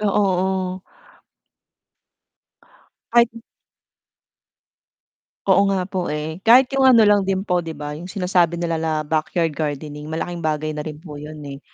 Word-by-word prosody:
Oo, 210 Hz, -, 0 dB
oo. 190 Hz, -2 st, 0 dB, 2.3 s
Kahit 235 Hz, 0 st, +5 dB, 2.2 s
Oo 195 Hz, +1 st, +4 dB
nga 190 Hz, -2 st, 0 dB
po, 185 Hz, -1 st, -3 dB
eh. 150 Hz, +3 st, -4 dB
Kahit 250 Hz, +6 st, +5 dB
yung 270 Hz, -1 st, +4 dB
ano 230 Hz, -4 st, +7 dB
lang 205 Hz, -1 st, +5 dB
din 190 Hz, 0 st, 0 dB
po 180 Hz, -3 st, +1 dB
'di 160 Hz, -2 st, -7 dB
ba, 150 Hz, 0 st, -5 dB
yung 170 Hz, +4 st, -8 dB
sinasabi 180 Hz, -3 st, +1 dB
nila 165 Hz, -1 st, -2 dB
na 160 Hz, -1 st, -1 dB
backyard 160 Hz, +2 st, 0 dB
gardening, 150 Hz, 0 st, -5 dB
malaking 170 Hz, +2 st, -4 dB
bagay 155 Hz, -1 st, -1 dB
na 150 Hz, -, -5 dB
rin 150 Hz, 0 st, -6 dB
po 150 Hz, -2 st, -10 dB
yun, 150 Hz, +1 st, -9 dB
eh. 140 Hz, 0 st, -8 dB
175 Hz, 145 wpm, -21 LUFS, 155-190 Hz, 2.3 s, ano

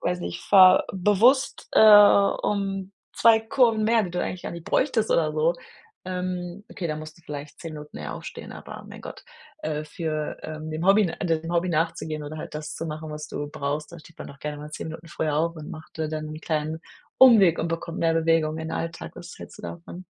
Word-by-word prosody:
weiß 180 Hz, 0 st, -1 dB
nicht, 170 Hz, 0 st, -5 dB
fahr 185 Hz, -2 st, +7 dB
bewusst, 210 Hz, +9 st, +3 dB
äh, -, -, +5 dB
um 200 Hz, -2 st, +5 dB, 0.2 s
2 230 Hz, -1 st, +6 dB
Kurven 225 Hz, -1 st, +2 dB
mehr, 225 Hz, 0 st, +3 dB
die 180 Hz, -, -5 dB
du 180 Hz, +1 st, -2 dB
eigentlich 180 Hz, -, -4 dB
gar -, -, -5 dB
nicht 170 Hz, -1 st, -8 dB
bräuchtest, 240 Hz, -5 st, +1 dB
oder 155 Hz, -2 st, +2 dB
so. 155 Hz, +3 st, +2 dB, 0.5 s
Ähm, 180 Hz, +1 st, -4 dB
okay, 175 Hz, -, -4 dB
da 155 Hz, -, -2 dB
musst 155 Hz, 0 st, -9 dB
du -, -, -22 dB
vielleicht 145 Hz, 0 st, -8 dB
10 165 Hz, -, -7 dB
Minuten 150 Hz, 0 st, -10 dB
eher 75 Hz, -2 st, -5 dB
aufstehen, -, -, -9 dB
aber -, -, -10 dB
mein -, -, -10 dB
Gott, -, -, -10 dB, 0.4 s
äh, 155 Hz, 0 st, -3 dB
für, 155 Hz, -1 st, -4 dB
äh, 155 Hz, -1 st, -6 dB
dem 155 Hz, +1 st, -4 dB
Hobby 200 Hz, 0 st, +5 dB, 0.2 s
dem 165 Hz, -2 st, -1 dB
Hobby 175 Hz, +1 st, +1 dB
nachzugehen 160 Hz, -1 st, -1 dB
oder 155 Hz, +2 st, -7 dB
halt 150 Hz, -, -8 dB
das 150 Hz, 0 st, -5 dB
zu 165 Hz, -, -5 dB
machen, 155 Hz, 0 st, -6 dB
was 150 Hz, 0 st, -6 dB
du 145 Hz, -, -4 dB
brauchst, 145 Hz, +1 st, -3 dB
da 170 Hz, -, -9 dB
steht 160 Hz, +1 st, -17 dB
man -, -, -7 dB
doch 140 Hz, -, -13 dB
gerne 150 Hz, -1 st, -5 dB
mal 150 Hz, +1 st, -9 dB
10 155 Hz, -, -6 dB
Minuten 160 Hz, +1 st, -9 dB
früher 155 Hz, -1 st, -2 dB
auf 165 Hz, +1 st, 0 dB
und 150 Hz, -, -8 dB
macht, 155 Hz, 0 st, -11 dB
äh, 155 Hz, -, -1 dB
dann 155 Hz, -1 st, -4 dB
'n 155 Hz, +1 st, -8 dB
kleinen 155 Hz, 0 st, -2 dB, 0.4 s
Umweg 215 Hz, -10 st, +7 dB
und 165 Hz, -, -1 dB
bekommt 165 Hz, +1 st, -4 dB
mehr 165 Hz, -1 st, +3 dB
Bewegung 165 Hz, -1 st, +1 dB
in 160 Hz, 0 st, -5 dB
den -, -, -5 dB
Alltag. 165 Hz, 0 st, -5 dB
Was 175 Hz, -1 st, -10 dB
hältst -, -, -11 dB
du -, -, -12 dB
davon? 175 Hz, +2 st, -8 dB
165 Hz, 220 wpm, -25 LUFS, 155-185 Hz, 0.5 s, fahr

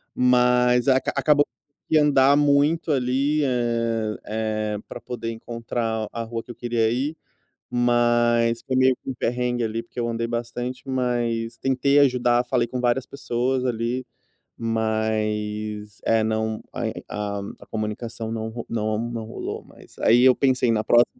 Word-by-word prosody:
Mas 125 Hz, 0 st, +4 dB
aca 130 Hz, -1 st, +3 dB
acabou 145 Hz, -1 st, +4 dB, 0.4 s
que 155 Hz, -, +4 dB
andar 140 Hz, -2 st, +5 dB
muito 145 Hz, +3 st, +3 dB
ali, 140 Hz, +3 st, +1 dB
eh 115 Hz, -4 st, 0 dB
eh, 110 Hz, -1 st, -2 dB
para 120 Hz, -, -7 dB
poder 120 Hz, -2 st, -5 dB
encontrar 115 Hz, -1 st, -3 dB
a 115 Hz, -, -4 dB
rua 115 Hz, 0 st, -4 dB
que 125 Hz, -, -10 dB
eu -, -, -10 dB
queria 120 Hz, -2 st, 0 dB
ir, 140 Hz, +6 st, -2 dB, 0.5 s
mas 120 Hz, -1 st, +2 dB
foi 130 Hz, -, -2 dB
meio 130 Hz, 0 st, +4 dB
que -, -, -6 dB
um -, -, -2 dB
perrengue 120 Hz, 0 st, -1 dB
ali, 115 Hz, +1 st, -2 dB
porque 115 Hz, -, -9 dB
eu 120 Hz, -, 0 dB
andei 115 Hz, 0 st, -2 dB
bastante, 120 Hz, +2 st, -4 dB
mas 120 Hz, -3 st, -1 dB
tentei 135 Hz, +3 st, +2 dB
ajudar, 125 Hz, -3 st, +3 dB
falei 120 Hz, -2 st, +1 dB
com 125 Hz, -, -4 dB
várias 125 Hz, +1 st, +1 dB
pessoas 130 Hz, -1 st, -1 dB
ali, 120 Hz, +1 st, -1 dB, 0.5 s
mas 110 Hz, -2 st, -2 dB
é 115 Hz, -1 st, +3 dB
não 110 Hz, 0 st, -1 dB
a 105 Hz, -1 st, -4 dB, 0.2 s
a -, -, -13 dB
comunicação 110 Hz, +1 st, -4 dB
não 110 Hz, 0 st, -3 dB
ro 115 Hz, +1 st, -6 dB
não 110 Hz, -1 st, -1 dB
não 115 Hz, -2 st, -4 dB
rolou. 110 Hz, -, -6 dB
Mas -, -, -18 dB
aí 120 Hz, +2 st, +5 dB
eu 130 Hz, -1 st, +7 dB
pensei: 130 Hz, -3 st, +2 dB
"Na 110 Hz, -1 st, 0 dB
próxima", 120 Hz, 0 st, +5 dB
120 Hz, 155 wpm, -24 LUFS, 110-125 Hz, 0.5 s, eu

